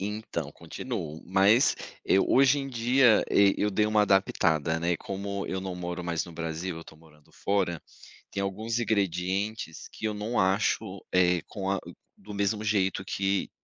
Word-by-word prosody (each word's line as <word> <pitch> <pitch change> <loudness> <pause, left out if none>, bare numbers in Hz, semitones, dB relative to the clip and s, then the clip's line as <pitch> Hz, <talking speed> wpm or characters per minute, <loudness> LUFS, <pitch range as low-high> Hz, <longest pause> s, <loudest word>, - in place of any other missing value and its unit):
Então 105 +2 -4
continuo, 75 +2 -6
mas 100 - +4 0.3
eu 95 - +4
hoje 135 +1 +5
em 135 -1 -4
dia, 125 -1 +4
eu 100 +1 +4
dei 105 +2 +2
uma 105 0 +3
adaptada, 80 -5 +2
né, 85 0 +1
como 100 +2 -5
eu 95 - -3
não 95 -1 -5
moro 90 0 -4
mais 85 -2 -2
no 85 - -11
Brasil, 80 +2 -4
eu 80 - -9
tô 80 - -14
morando 75 -2 -22
fora, 95 -4 -1 0.5
tem 100 - -3
alguns 110 +4 -2
ingredientes 100 -2 -1
que 110 - -4
eu 105 - -1
não 105 +4 -1
acho, 95 +1 0
eh, 90 -2 +3
com 95 -2 -4
a 100 - +1 0.4
do 105 +1 -10
mesmo 100 +1 0
jeito 95 -2 +1
que 95 0 -1
95 Hz, 165 wpm, -28 LUFS, 90-105 Hz, 0.5 s, hoje